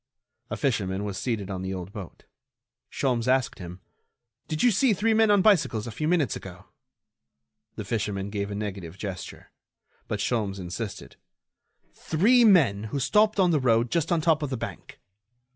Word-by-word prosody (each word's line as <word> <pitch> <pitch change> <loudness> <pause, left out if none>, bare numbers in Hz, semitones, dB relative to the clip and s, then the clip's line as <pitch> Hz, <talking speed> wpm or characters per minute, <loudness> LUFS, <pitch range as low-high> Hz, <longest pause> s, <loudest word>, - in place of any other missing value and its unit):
A - - -4
fisherman 100 -7 -1
was 100 -2 -4
seated 105 -6 -3
on 95 -1 -4
the 95 0 -3
old 90 +1 -7
boat. 100 -6 -9 0.7
Sholmes 125 -3 -1
asked 130 -1 +1
him: 90 0 -9 0.7
"Did 155 0 -2
you 245 - +5
see 225 +3 +3
three 220 +3 +1
men 220 0 +4
on 205 -2 +4
bicycles 165 - +3
a 115 - -6
few 155 +8 -3
minutes 160 - +1
ago?" 95 +1 -10 1.1
The 110 - -6
fisherman 100 -2 -3
made 100 -1 -2
a 100 - -5
negative 100 -4 -6
gesture. 95 -3 -7 0.6
But 105 -3 -3
Sholmes 100 -3 -1
insisted: 95 +4 -6 0.8
"Three 230 +10 +3
men 145 - +4
who 140 +6 -3
stopped 210 - +2
on 180 -2 +4
the 155 - +2
road 120 -2 +2
just 165 -1 0
on 170 -2 +2
top 160 -1 +2
of 145 - -2
the 130 - -3
bank?" - - -8
115 Hz, 170 wpm, -26 LUFS, 100-165 Hz, 1.1 s, you